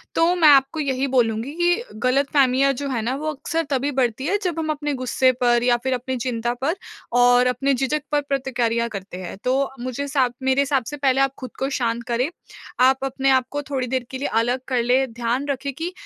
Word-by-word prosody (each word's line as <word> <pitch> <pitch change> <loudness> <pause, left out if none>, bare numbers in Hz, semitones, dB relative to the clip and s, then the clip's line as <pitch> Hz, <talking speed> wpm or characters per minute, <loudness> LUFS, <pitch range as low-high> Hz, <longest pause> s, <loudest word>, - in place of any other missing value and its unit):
तो 335 +2 +3
मैं 335 -3 +5
आपको 275 +2 +4
यही 275 -2 0
बोलूँगी 240 0 0
कि 350 +6 +1 0.2
ग़लतफ़हमियाँ 275 0 +3
जो 280 +2 -4
है 245 -4 -1
ना 240 +4 -1
वो 310 +2 -3
अक्सर 325 +4 -2
तभी 275 +1 0
बढ़ती 260 -1 0
है 400 +6 +1
जब 345 -3 -1
हम 315 -1 -2
अपने 295 -1 -2
ग़ुस्से 255 0 +2
पर 240 -1 +3
या 245 -1 +3
फिर 260 0 0
अपनी 255 +1 -3
चिंता 240 -1 -2
पर 315 +6 0 0.4
और 245 0 +5
अपने 275 +2 +1
झिझक 270 +4 0
पर 295 - +2
प्रतिक्रिया 245 -4 -1
करते 195 -4 -7
हैं। 185 +1 -7
तो 270 +2 +1
मुझे 255 +3 -3
सा 270 -2 +2 0.2
मेरे 265 +1 +3
हिसाब 275 -2 +1
से 295 - -5
पहले 270 -1 +2
आप 275 -1 +2
ख़ुद 255 -3 -6
को 270 - -1
शांत 235 -3 -1
करें। 245 +4 0 0.5
आप 265 +1 +4
अपने 270 0 0
आपको 260 +3 +1
थोड़ी 260 -3 -2
देर 255 -1 -2
के 260 - -4
लिए 280 - -2
अलग 245 +3 0
कर 250 -3 +1
लें, 255 +1 +2
ध्यान 240 +3 -1
रखें 280 0 -2
कि 330 +6 -4
265 Hz, 215 wpm, -22 LUFS, 245-280 Hz, 0.5 s, मैं